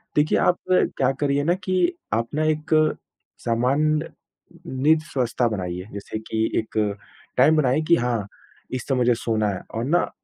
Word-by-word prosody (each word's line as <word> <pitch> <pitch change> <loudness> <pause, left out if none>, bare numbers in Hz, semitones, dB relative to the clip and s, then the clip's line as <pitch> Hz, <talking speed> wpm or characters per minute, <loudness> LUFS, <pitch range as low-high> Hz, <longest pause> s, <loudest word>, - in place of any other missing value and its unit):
देखिए, 150 +1 +3
आप 180 - +3
क्या 135 -7 +2
करिए 145 -1 +1
ना 170 +4 +3
कि 185 - +1 0.2
आप 115 +1 0
ना 155 - +1
एक 155 0 -1 0.8
सामान्य 140 +6 +1 0.6
नींद 150 +5 +2
स्वस्था 125 -4 0
बनाइए 90 -4 -4
जैसे 100 +2 -5
कि 110 0 -2 0.2
एक 110 0 -6 0.6
टाइम 145 +5 +6
बनाइए 135 0 +2
कि 170 - +6
हाँ, 120 -7 -1 0.4
इस 130 -1 -4
समय 135 - +1
मुझे 125 -1 +3
सोना 110 -2 0
है 95 -2 -4
और 115 - -1
ना 170 +6 +2
130 Hz, 160 wpm, -23 LUFS, 115-155 Hz, 0.8 s, टाइम